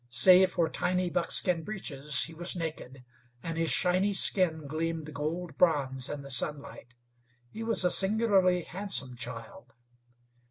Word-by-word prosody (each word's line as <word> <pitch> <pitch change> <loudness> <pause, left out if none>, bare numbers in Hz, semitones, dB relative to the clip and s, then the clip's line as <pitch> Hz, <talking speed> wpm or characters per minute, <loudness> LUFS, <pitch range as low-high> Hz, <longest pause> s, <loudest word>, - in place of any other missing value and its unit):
Save 180 +9 +6
for 170 -2 0
tiny 180 +2 -3
buckskin 170 +1 +2
breeches, 150 -7 -3
he 165 - -6
was 175 +3 -5
naked, 145 -6 -8 0.4
and 165 -1 -5
his 165 0 -1
shiny 185 +8 +1
skin 175 -5 +1
gleamed 155 +1 -5
gold 155 +2 -6
bronze 135 -7 +1
in 145 -1 -7
the 140 - -4
sunlight. 130 -2 -2 0.6
He 225 - -9
was 225 -5 +1
a 180 - +2
singularly 195 -3 +3
handsome 175 -9 0
child. 115 -2 -10
165 Hz, 135 wpm, -28 LUFS, 140-185 Hz, 0.6 s, Save